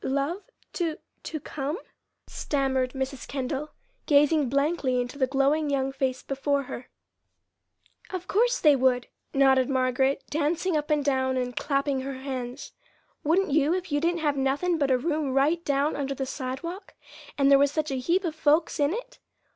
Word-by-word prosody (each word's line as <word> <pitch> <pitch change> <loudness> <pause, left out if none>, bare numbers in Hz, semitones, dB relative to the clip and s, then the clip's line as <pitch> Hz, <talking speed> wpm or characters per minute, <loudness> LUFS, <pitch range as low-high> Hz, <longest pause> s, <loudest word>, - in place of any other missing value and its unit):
"Love 280 +8 -1 0.3
to 330 -3 -1 0.2
to 310 - -5
come?" 290 +3 -4 0.5
stammered 265 -3 -1
Mrs. 265 0 -4
Kendall, 275 +2 -3 0.4
gazing 295 -1 +4
blankly 280 -2 +1
into 245 +3 -4
the 260 - +3
glowing 280 +3 +2
young 270 -1 0
face 265 -1 -2
before 280 +1 -1
her. 250 -1 -8 1.2
"Of 370 -1 -5
course 485 +4 +2
they 300 -3 +6
would!" 255 -2 +2 0.3
nodded 265 -1 +4
Margaret, 265 +1 +1
dancing 320 +4 0
up 300 0 -1
and 300 -2 +1
down 260 -2 +1
and 250 -1 -2
clapping 275 -1 0
her 270 0 -5
hands. 260 0 -6 0.5
"Wouldn't 330 +3 +2
you 305 +3 +3
if 365 -3 -5
you 290 - +2
didn't 340 0 0
have 295 -2 +1
nothin' 290 +6 +1
but 280 -2 +1
a 260 - +4
room 300 -1 -1
right 310 +5 +2
down 285 0 +1
under 275 -1 -2
the 270 - -3
sidewalk, 280 +9 -6 0.4
and 275 0 +4
there 275 - +7
was 285 0 +4
such 310 -1 -1
a 265 - -1
heap 345 +9 +1
of 325 - -1
folks 315 +1 +2
in 290 +5 +2
it? - - -8
280 Hz, 170 wpm, -26 LUFS, 265-310 Hz, 1.2 s, there